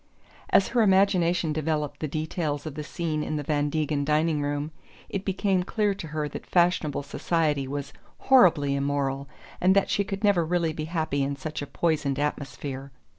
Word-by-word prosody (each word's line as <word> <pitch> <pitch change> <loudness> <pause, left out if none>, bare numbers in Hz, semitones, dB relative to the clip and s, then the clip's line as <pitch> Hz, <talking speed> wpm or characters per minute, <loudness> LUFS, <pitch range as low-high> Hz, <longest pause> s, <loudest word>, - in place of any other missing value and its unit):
As 195 - +4
her 245 - +2
imagination 180 -5 +3
developed 150 -2 -2
the 155 - -2
details 155 0 -3
of 155 - -5
the 150 +1 -5
scene 155 0 -3
in 155 - -3
the 150 - -2
Van 145 0 0
Degen 150 -1 0
dining 150 +1 +1
room 145 +1 -2 0.4
it 195 -1 -3
became 195 -1 +1
clear 205 +2 0
to 180 -4 -7
her 150 0 -2
that 145 - -8
fashionable 170 -5 +2
society 150 -1 0
was 140 +1 -5 0.2
horribly 170 - +5
immoral 140 -1 -1 0.3
and 185 +2 +4
that 200 - +2
she 200 - +2
could 195 +1 -5
never 200 -5 +4
really 165 -1 0
be 155 0 -4
happy 160 -4 -1
in 140 +1 -1
such 150 +3 -5
a 145 - -5
poisoned 145 -2 0
atmosphere. 140 -2 -4
155 Hz, 175 wpm, -26 LUFS, 145-175 Hz, 0.4 s, horribly